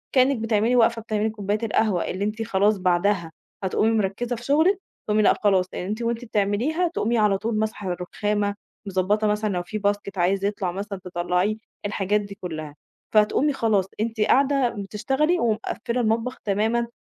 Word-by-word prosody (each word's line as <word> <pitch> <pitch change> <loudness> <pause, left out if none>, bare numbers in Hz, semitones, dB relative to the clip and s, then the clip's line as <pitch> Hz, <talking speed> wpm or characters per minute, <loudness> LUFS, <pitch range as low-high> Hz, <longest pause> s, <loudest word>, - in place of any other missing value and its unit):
كإنِّك 260 0 +4
بتعملي 225 +2 +1
واقفة 230 -1 +3
بتعملي 215 -1 -1
كوباية 210 -1 -2
القهوة 215 -4 +1
اللي 190 +2 -3
أنتِ 215 +2 -2
خلاص 205 0 +2
بعدها 180 -1 +1 0.3
هتقومي 210 +4 +2
مركّزة 225 +3 -1
في 235 - -10
شُغلِك 320 +9 +3 0.3
تقومي 215 0 +3
لأ، - - +6
خلاص 190 -3 +4
يعني 180 - -4
أنتِ 215 +3 -3
وأنتِ 235 +1 -2
بتعمليها 225 - 0
تقومي 240 -8 0
على 210 -3 +3
طول 225 +2 -2
ماسحة 215 -3 -2
الرُخامة، 205 +3 -1 0.3
مضبّطة 195 +3 +1
مثلًا 210 +1 0
لو 175 -1 -1
في 215 +4 -5
basket 205 -1 -2
عايز 190 +3 +1
يطلع 200 -3 -1
مثلًا 200 +1 -5
تطلّعيه 180 +3 0 0.3
الحاجات 205 0 0
دي 200 0 -9
كلّها. 155 -4 -6 0.4
فهتقُومي 220 +7 +3
خلاص، 220 -7 +1
أنتِ 225 0 -2
قاعدة 270 +3 +3
بتشتغلي 235 - 0
ومقفّلة 235 +1 -1
المطبخ 230 +3 0
تمامًا 220 +4 +1
210 Hz, 160 wpm, -24 LUFS, 195-230 Hz, 0.4 s, لأ